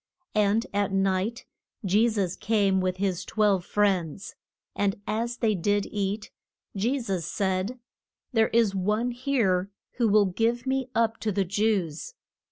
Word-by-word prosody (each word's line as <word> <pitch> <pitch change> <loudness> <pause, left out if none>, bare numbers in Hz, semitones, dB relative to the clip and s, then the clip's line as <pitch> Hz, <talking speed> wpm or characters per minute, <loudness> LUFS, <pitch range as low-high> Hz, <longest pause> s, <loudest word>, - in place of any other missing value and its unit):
And 210 +2 +2
at 200 -1 0
night 195 +3 0 0.4
Je 210 +5 +4
sus 195 -5 -1
came 200 -3 +1
with 185 0 -1
his 185 -2 -1
twelve 205 -3 +1
friends. 190 -3 0 0.4
And 200 -1 0
as 235 +3 -2
they 220 -2 +2
did 205 +2 +1
eat, 205 +1 -2 0.4
Je 240 +8 0
sus 195 -8 -2
said, 190 +6 -1 0.6
There 225 -1 +4
is 225 -3 +3
one 210 +6 0
here 235 -8 0 0.3
who 235 -2 +3
will 205 0 +5
give 230 +6 0
me 265 -1 -1
up 225 -1 +1
to 220 - -1
the 195 0 0
Jews. 195 - -1
205 Hz, 145 wpm, -26 LUFS, 190-225 Hz, 0.6 s, will